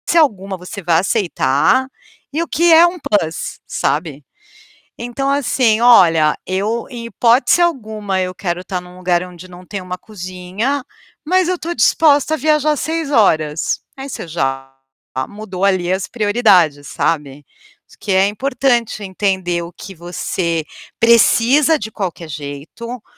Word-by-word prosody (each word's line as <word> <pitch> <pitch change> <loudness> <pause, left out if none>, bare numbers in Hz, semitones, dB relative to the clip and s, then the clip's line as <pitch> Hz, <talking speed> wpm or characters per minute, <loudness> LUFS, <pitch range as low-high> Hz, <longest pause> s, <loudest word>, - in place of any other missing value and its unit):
alguma 200 - +2
você 180 +3 -8
vá 170 -1 +2
aceitar, 195 - +1 0.5
e 320 - 0
o - - -7
que 340 +2 +2
é 330 +2 +8
uma 350 0 -1
plus, 165 - -2
sabe. 145 0 -2 0.8
Então 245 +4 -3
assim, 250 -5 +2
"Olha, 165 -10 +5
eu, 205 +5 -2
em 240 -2 -7
hipótese 235 - +3
alguma, 215 - -1
eu 185 0 -3
quero 175 0 -3
estar 185 -1 -4
num 180 0 -14
lugar 180 -1 0
onde 180 0 -12
não 180 0 -13
tem 200 +1 -5
uma 180 0 -6
cozinha, 195 +7 -4 0.4
mas 365 +2 +2
eu 365 - 0
estou 340 +1 -5
disposta 290 +5 +3
a - - 0
viajar 305 0 +2
6 320 0 -3
horas". 160 - +1 0.2
Aí, 270 +1 -7
você 240 - -6
já 135 -4 -3 0.6
mudou 200 -3 -5
ali 185 -2 +1
as 190 0 -2
prioridades, 200 - +2
sabe, 145 -3 -2 0.6
que 200 - -2
é 190 +1 +4
importante 240 -1 0
entender 190 -3 -1
o 170 - -8
que 195 +2 -10
você 170 -1 -3 0.4
precisa 235 +6 +4
de 220 0 -6
qualquer 175 -5 -5
jeito, 155 - -7
200 Hz, 140 wpm, -17 LUFS, 175-250 Hz, 0.8 s, é